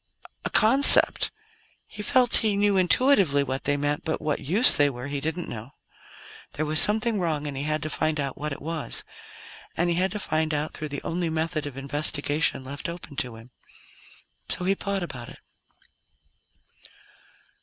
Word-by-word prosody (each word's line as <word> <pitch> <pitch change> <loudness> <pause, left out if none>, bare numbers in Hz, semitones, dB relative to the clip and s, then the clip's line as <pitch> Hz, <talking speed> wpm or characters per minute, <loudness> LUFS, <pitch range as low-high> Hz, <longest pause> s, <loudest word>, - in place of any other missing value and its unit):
A - - -3
concept? 265 +6 +6 0.6
He 210 - -10
felt 250 +2 +2
he 215 -3 0
knew 205 0 +1
intuitively 185 - +3
what 135 0 -5
they 145 0 +1
meant, 145 +1 -3
but 160 - -3
what 150 -2 -3
use 185 - +5
they 145 0 +3
were 125 -2 -8
he 145 0 -5
didn't 160 +4 -5
know. 115 +3 -10 0.8
There 155 - -3
was 155 0 +6
something 220 +1 +3
wrong, 155 -4 -2
and 145 -2 -6
he 135 - -5
had 155 0 -2
to 155 - -4
find 155 -1 -2
out 140 -2 -4
what 150 +2 -6
it 140 - -8
was. 160 -1 -4 0.7
And 175 +1 +1
he 170 - -1
had 185 +1 0
to - - -4
find 155 -5 -2
out 150 +1 -4
through 155 - -7
the 145 -1 -7
only 170 0 -3
method 160 -1 -3
of 135 -2 -10
investigation 145 +1 -1
left 140 +4 -7
open 170 -4 -10
to 125 -7 -3
him. 115 +3 -15 1.0
So 180 - -2
he 195 - +2
thought 200 -1 -4
about 125 -8 -8
it. - - -14
155 Hz, 175 wpm, -24 LUFS, 145-180 Hz, 1.0 s, concept